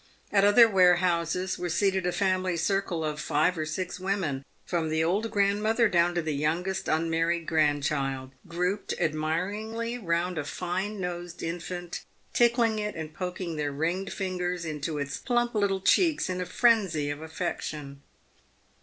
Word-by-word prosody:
At 200 -1 +4
other 205 +3 +8
warehouses 180 -2 +2
were 175 - -2
seated 190 +1 +1
a - - +1
family 185 -2 0
circle 180 -2 0
of 150 0 -3
five 155 +5 +2
or 155 -2 -3
six 180 +4 -4
women 180 -8 -1
— - - -39
from 165 -3 -1
the 160 0 +1
old 200 +7 +1
grandmother 210 +3 +2
down 175 -2 +2
to 175 - 0
the 155 -1 -1
youngest 165 +6 -1
unmarried 165 +1 +1
grandchild 140 -4 0
— - - -22
grouped 180 +4 -1
admiringly 205 +10 -2
round 175 -3 -1
a - - -2
fine 185 +7 -3
nosed 175 -1 -5
infant, 175 +1 -5 0.3
tickling 235 -2 +3
it, 210 0 -3
and 160 -1 -6
poking 180 -2 -4
their 145 -1 -1
ringed 170 +7 -2
fingers 180 -2 -2
into 155 0 -3
its 140 -1 -3
plump 240 -1 0
little 200 -3 +1
cheeks 305 - +3
in 185 0 -2
a 180 - -3
frenzy 180 -9 +2
of 145 +1 -6
affection. 155 -4 -5
180 Hz, 155 wpm, -28 LUFS, 160-195 Hz, 0.3 s, other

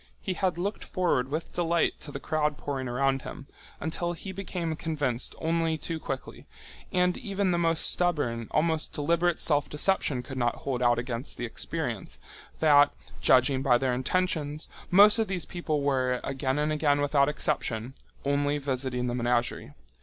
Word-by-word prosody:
He 190 - -3
had 185 -1 0
looked 200 +4 -3
forward 170 -9 0
with 155 +3 -4
delight 170 -1 +1
to 145 - -7
the 140 - -5
crowd 150 0 0
pouring 135 -2 -4
around 135 +2 +1
him, 140 - -8 0.3
until 170 +3 -2
he 190 +3 -7
became 180 -4 -3
convinced 145 -7 -2
only 165 0 0
too 160 +1 -4
quickly—and 180 +6 -4
even 200 -3 -1
the 175 - +1
most 165 -1 +2
stubborn, 145 -11 0
almost 160 -1 0
deliberate 170 +3 +1
self 145 -2 +2
deception 150 -5 0
could 130 +1 -6
not 120 -1 +1
hold 130 -3 -1
out 120 -1 +4
against 120 +1 -4
the 120 - -3
experience—that, 145 +5 0 0.3
judging 130 +1 +4
by 130 -3 +4
their 130 0 0
intentions, 150 +2 -1 0.2
most 205 +4 +7
of 220 - +1
these 185 -2 -2
people 155 -5 -2
were, 130 -3 +1
again 135 0 -1
and 150 +1 +1
again 145 -2 +2
without 145 0 +3
exception, 120 -4 -1 0.3
only 145 +1 +1
visiting 130 -3 -2
the 120 - -1
menagerie. 120 -10 -1
145 Hz, 155 wpm, -28 LUFS, 130-170 Hz, 0.3 s, most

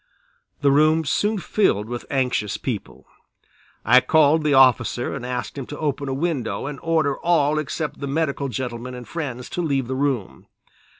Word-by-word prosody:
The 140 -1 +4
room 155 +3 +4
soon 210 +9 +1
filled 175 - +1
with 120 0 -6
anxious 125 -6 0
people. 115 -7 -5 0.8
I 125 +4 +7
called 155 +3 +4
the 150 -2 +3
officer 125 -2 +3
and 135 -3 -5
asked 125 +2 -4
him 130 - -6
to 145 - -7
open 145 -2 -2
a - - -1
window 150 -4 -2
and 145 -1 -5
order 160 -4 +1
all 155 -3 +2
except 155 +1 -4
the 140 - -4
medical 140 -1 -1
gentlemen 125 +1 -5
and 125 -1 -9
friends 130 -7 -5
to 180 - -2
leave 140 -6 0
the 130 - -3
room. 130 -7 -2
140 Hz, 170 wpm, -22 LUFS, 125-155 Hz, 0.8 s, I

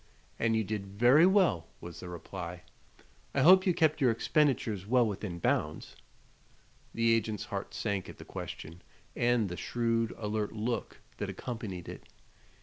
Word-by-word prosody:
"And 115 0 +2
you 110 - +2
did 105 -1 -4
very 120 - +5
well," 185 - +3
was 85 -1 -9
the 90 - -8
reply. 90 0 -7 0.7
"I - - +3
hope 185 +3 +7
you 180 - +4
kept 155 -2 +2
your 130 - +5
expenditures 115 - +1
well 125 +1 +4
within 100 -4 -4
bounds?" 75 -2 -1 1.0
The 115 0 +2
agent's 110 -2 -1
heart - - -5
sank 100 -2 -2
at - - -10
the - - -11
question 85 +3 -8 0.3
and 120 -3 +2
the 90 -1 -6
shrewd, 115 -1 0
alert 105 -1 -2
look 115 +2 -3 0.2
that - - -3
accompanied 110 -8 -6
it. - - -9
110 Hz, 150 wpm, -31 LUFS, 95-120 Hz, 1.0 s, hope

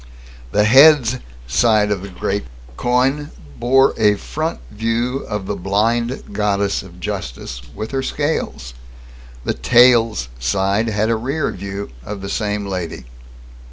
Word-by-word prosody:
The 105 - +3
"Heads" 130 +1 +6 0.3
side 105 - +3
of 100 -3 -1
the 100 - -7
great 95 +2 -3 0.3
coin 130 - +1 0.3
bore 135 +3 +4
a 105 -1 +4
front 155 +10 -4
view 115 +4 -1
of 105 -3 -3
the 100 - -3
blind 115 +7 -1
goddess 100 -1 0
of 90 -2 -14
justice, 75 -11 -5
with 110 +1 -5
her 135 -1 -1
scales. 130 - -2 0.7
The - - -1
"Tails" 115 - +4
side 95 - +1
had 110 +1 0
a - - +2
rear 135 +7 -2
view 100 -3 -6
of 100 +8 -6
the 100 - -5
same 105 0 -2
lady. 90 -9 -5
105 Hz, 135 wpm, -19 LUFS, 100-125 Hz, 0.7 s, Heads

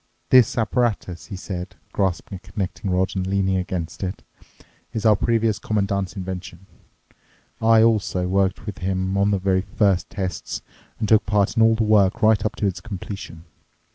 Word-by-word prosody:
"This 125 -3 +6
apparatus," 115 -6 -1
he 100 - -6
said, 95 -1 -6 0.2
grasping 95 +1 -1
a - - -14
connecting 95 -1 -3
rod 95 +1 0
and 95 -1 -1
leaning 95 -1 +1
against 90 -2 -4
it, 95 -1 -4 0.7
"is 110 - -3
our 110 -1 +6
previous 115 0 +1
Commandant's 100 -2 -1
invention. 95 -1 -6 1.0
I 110 0 +6
also 105 -5 +1
worked 95 0 0
with 105 -4 -6
him 95 +1 -1
on 100 +1 +3
the 100 - +2
very 95 0 +1
first 100 -1 +1
tests 95 -2 -4 0.3
and 110 - -2
took 110 0 +4
part 105 -1 +2
in 115 - +3
all 115 0 +5
the 110 - +1
work 105 +1 +3
right 110 -2 +4
up 110 - -1
to 105 - -2
its 95 -3 -1
completion. 95 -5 -7
100 Hz, 170 wpm, -23 LUFS, 95-110 Hz, 1.0 s, This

